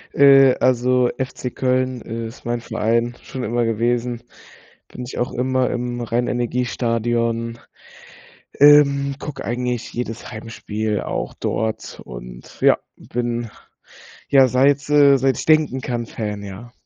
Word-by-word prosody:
Äh, 135 -2 +7
also 125 0 +3
FC 130 -1 -4
Köln 130 -1 0
ist 115 +2 -7
mein 120 0 -2
Verein 115 +1 -1
schon 130 -1 -7
immer 120 +1 0
gewesen. 120 +1 -1 0.7
Bin 125 - -8
ich - - -8
auch 120 - -1
immer 130 +1 0
im 120 0 -3
Rhein-Energie-STADION, 115 -1 -1 1.0
ähm, 140 -1 +6
gucke 140 -3 -7
eigentlich 125 0 -3
jedes 120 0 -5
Heimspiel 110 -2 -4
auch - - -4
dort 110 0 -3
und - - -11
ja, - - +5 0.2
bin, 120 -1 -3 0.8
ja, 135 -2 +6
seit, 140 +3 +2
äh 145 -1 +6
seit 135 0 +1
ich - - -4
denken 155 -4 +3
kann, 120 -2 -3
Fan, 105 -2 -5
ja. 100 +5 -9
120 Hz, 125 wpm, -21 LUFS, 115-130 Hz, 1.0 s, Äh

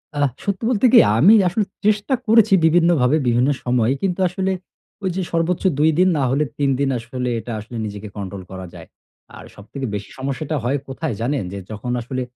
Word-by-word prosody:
আ - - -5 0.3
সত্যি 200 +2 -3
বলতে 250 0 +2
কি - - +10 0.2
আমি 180 - +7
আসলে 200 +4 0 0.2
চেষ্টা 210 +5 +1
করেছি 220 -1 +5
বিভিন্নভাবে, 160 -5 +3
বিভিন্ন 120 +3 +2
সময়ে, 125 0 +1
কিন্তু 190 -1 -1
আসলে 190 +2 -2 0.5
ঐ - - -3
যে 190 - -1
সর্বোচ্চ 170 +1 0 0.2
২ 155 +2 +4
দিন, 185 +1 +5
না 140 - +1
হলে 140 +4 +1
৩ 140 -1 +1
দিন 140 -1 +1
আসলে 125 +2 -4
এটা 115 +2 -7
আসলে 115 +3 -8
নিজেকে 105 0 -7
control 100 -1 -6
করা 95 0 -7
যায়। - - -11 0.5
আর - - -11
সবথেকে 130 +7 -7
বেশি 105 0 -6
সমস্যাটা 140 +3 -3
হয় 130 +4 0
কোথায় 135 +1 -4
জানেন? 130 0 -1
যে 100 - -6
যখন 110 +4 -5
আসলে, 130 +2 -4
140 Hz, 190 wpm, -20 LUFS, 120-180 Hz, 0.5 s, কি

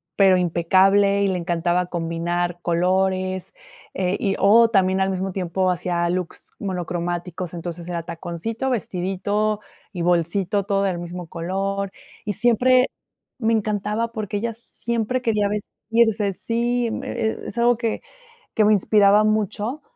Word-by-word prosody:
pero 190 -2 +5
impecable, 190 +4 +3
y - - +3
le 185 -2 0
encantaba 175 +1 0
combinar 175 +1 -2
colores, 185 +2 0 0.4
eh, 185 0 0
y 195 -1 -1
o 225 +4 +6
también 190 -2 +2
al 190 - +2
mismo 190 0 -2
tiempo 185 0 0
hacía 175 -1 0
looks 180 -1 -4
monocromáticos. 175 -1 -3
Entonces, 170 0 -6
era 170 -1 -3
taconcito, 175 +9 -4
vestidito 205 0 -1 0.3
y 180 - -5
bolsito, 180 +4 +1
todo 200 -1 +1
del 185 -3 -1
mismo 175 0 -7
color. 195 +4 -3 0.3
Y 210 - -2
siempre 250 +4 +3 0.5
me 225 -2 +1
encantaba, 215 +1 -1
porque 210 -3 -3
ella 230 +2 -2
siempre 235 +1 -3
quería 210 -4 +1
vestirse 210 0 0
sí, 235 +4 -1
mm, - - -4
eh, - - -5 0.2
e - - -7
es - - -8
algo 240 +1 +4
que 230 -1 -2 0.5
que 220 - +3
me 210 - +5
inspiraba 205 +1 +4
mucho 215 +5 -1
195 Hz, 140 wpm, -22 LUFS, 175-215 Hz, 0.5 s, o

